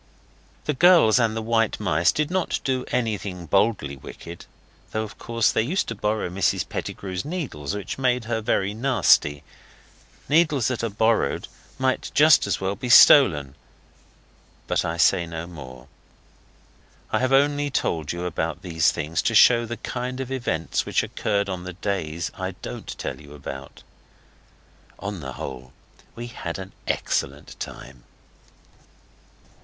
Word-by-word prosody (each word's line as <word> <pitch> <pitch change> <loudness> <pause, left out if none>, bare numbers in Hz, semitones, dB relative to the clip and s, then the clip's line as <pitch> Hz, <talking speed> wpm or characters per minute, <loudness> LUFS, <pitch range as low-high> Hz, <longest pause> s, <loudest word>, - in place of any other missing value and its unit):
The 150 - 0
girls 160 -7 +6
and 115 -2 +1
the 110 - -3
white 115 0 +1
mice 85 -5 +2
did 150 +2 -1
not 185 -1 0
do 130 -1 -1
anything 105 -7 -2
boldly 95 -6 +1
wicked 85 +5 -11 0.4
though 110 - -2
of 110 - -10
course 115 -1 +1
they - - +1
used 160 - -1
to - - -2
borrow 105 -1 -1
Mrs 90 0 0
Pettigrew's 95 -2 -5
needles, 135 - -4
which 100 +4 -5
made 125 -3 +1
her 110 -1 -2
very 100 -2 0
nasty. 110 - +3 0.8
Needles 150 -5 +3
that 130 -2 -3
are 115 - 0
borrowed 110 -6 +1 0.3
might 130 0 0
just 150 -6 +6
as 100 - 0
well 95 +1 -1
be 125 +5 -5
stolen. 80 - +7 1.1
But - - 0
I 80 0 -3
say 85 +1 +3
no 80 0 -6
more. 65 -7 -11 1.2
I - - +2
have 130 +1 0
only 145 +1 +3
told 80 - -1
you 85 +1 -3 0.4
these 80 -4 +2
things 75 +2 -2
to - - 0
show 120 -1 +6
the 120 +1 -5
kind 125 +3 -4
of 130 -1 -5
events 85 - -1
which - - 0
occurred 100 -1 -1
on 90 -2 -4
the 90 0 -7
days 85 -4 -3
I - - -5
don't - - -7
tell - - -5
you 75 0 -13
about. 70 -1 -9 1.1
On 100 -1 -5
the 65 -3 -7
whole, 65 -1 -8 0.4
we 120 - -6
had 100 -8 -6
an 95 0 -8 0.2
excellent - - -2
time. 65 -3 -9
105 Hz, 150 wpm, -24 LUFS, 85-125 Hz, 1.2 s, stolen